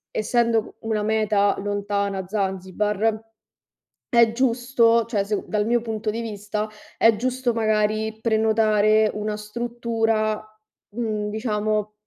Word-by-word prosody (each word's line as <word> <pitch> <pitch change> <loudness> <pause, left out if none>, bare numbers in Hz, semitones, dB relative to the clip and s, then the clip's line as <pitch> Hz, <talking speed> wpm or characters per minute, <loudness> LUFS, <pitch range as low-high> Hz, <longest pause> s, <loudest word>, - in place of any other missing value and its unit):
essendo 230 0 +1
una 220 -2 -2
meta 210 -2 +2
lontana, 200 -1 -2
Zanzibar, 205 +2 -1 0.9
è 235 -2 +5
giusto 235 -1 +2
cioè, 215 -4 -1
sec 205 +1 -3
dal 210 0 -1
mio 240 0 +2
punto 220 -1 -3
di 220 +2 -2
vista, 210 -1 -4 0.3
è 225 -1 +5
giusto, 250 +1 -1
magari 215 0 0
prenotare 220 -1 +3
una 210 0 -3
struttura, 225 -1 -1 0.5
mhmm, 215 -3 -2
diciamo, 215 -1 -1
215 Hz, 110 wpm, -23 LUFS, 210-230 Hz, 0.9 s, è